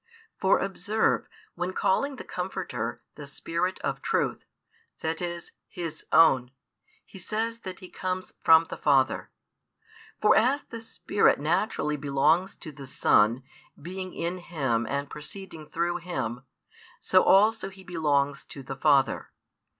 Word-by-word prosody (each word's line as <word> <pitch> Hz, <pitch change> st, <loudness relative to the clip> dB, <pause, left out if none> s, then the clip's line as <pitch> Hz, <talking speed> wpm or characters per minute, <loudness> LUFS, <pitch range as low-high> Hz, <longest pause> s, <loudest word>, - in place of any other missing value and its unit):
For 190 Hz, -, +4 dB
observe, 205 Hz, +3 st, 0 dB, 0.3 s
when 180 Hz, +1 st, -3 dB
calling 275 Hz, +11 st, +1 dB
the -, -, -8 dB
Comforter -, -, -4 dB
"the -, -, -10 dB
Spirit 175 Hz, +3 st, -2 dB
of -, -, -3 dB
truth," -, -, -1 dB, 0.6 s
that 160 Hz, +1 st, -2 dB
is, 175 Hz, -1 st, -5 dB, 0.2 s
His 165 Hz, -3 st, -6 dB
own, 135 Hz, -7 st, +5 dB, 0.6 s
He 195 Hz, -, -13 dB
says 225 Hz, +5 st, -2 dB
that 185 Hz, -4 st, -8 dB
He 185 Hz, -, -9 dB
comes 185 Hz, 0 st, -4 dB
from 160 Hz, 0 st, +7 dB
the -, -, -4 dB
Father. 135 Hz, -3 st, +2 dB, 0.9 s
For 210 Hz, -, +5 dB
as 260 Hz, +6 st, +3 dB
the 230 Hz, -2 st, -9 dB
Spirit 200 Hz, -2 st, +1 dB
naturally 150 Hz, -1 st, 0 dB
belongs 150 Hz, +7 st, +2 dB
to 155 Hz, -, -6 dB
the 140 Hz, -1 st, -10 dB
Son, 115 Hz, 0 st, +3 dB, 0.4 s
being 185 Hz, +3 st, -7 dB
in 175 Hz, +2 st, -3 dB
Him 135 Hz, -10 st, -1 dB
and 140 Hz, 0 st, -2 dB
proceeding 155 Hz, +1 st, -9 dB
through 175 Hz, +1 st, -1 dB
Him, 130 Hz, -8 st, -4 dB, 0.5 s
so -, -, +4 dB
also 210 Hz, +1 st, +4 dB
He 195 Hz, -1 st, -14 dB
belongs 145 Hz, -5 st, 0 dB
to 140 Hz, -, -10 dB
the 135 Hz, +1 st, -6 dB
Father. 140 Hz, -1 st, +2 dB
170 Hz, 135 wpm, -27 LUFS, 140-190 Hz, 0.9 s, from